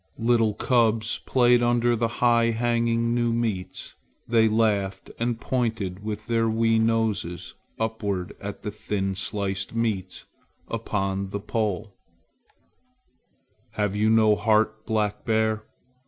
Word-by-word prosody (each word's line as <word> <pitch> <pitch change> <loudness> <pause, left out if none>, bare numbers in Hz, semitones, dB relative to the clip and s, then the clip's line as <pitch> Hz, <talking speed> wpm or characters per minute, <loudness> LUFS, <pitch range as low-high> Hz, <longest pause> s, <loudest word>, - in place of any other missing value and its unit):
Little 115 -2 +2
cubs 115 -1 +1
played 120 -1 +4
under 120 0 +2
the 115 0 +1
high 115 0 +2
hanging 115 0 +1
new 120 -1 +1
meats. 110 -6 -3 0.3
They 115 -1 +4
laughed 100 -4 0
and 120 0 -1
pointed 110 -7 -2
with 105 0 -5
their 115 -1 +1
wee 115 0 +2
noses 110 -6 -1 0.3
upward 105 -5 -2
at 100 0 -7
the 105 - -3
thin 100 -2 -2
sliced 95 +1 -3
meats 105 -5 -2 0.4
upon 95 0 -2
the 100 - -4
poles. 105 -1 -2 1.8
"Have 105 -1 -1
you 105 +1 +2
no 110 -1 +5
heart, 110 +1 +1
Black 105 -3 -1
Bear? 110 -1 0
110 Hz, 120 wpm, -25 LUFS, 100-115 Hz, 1.8 s, no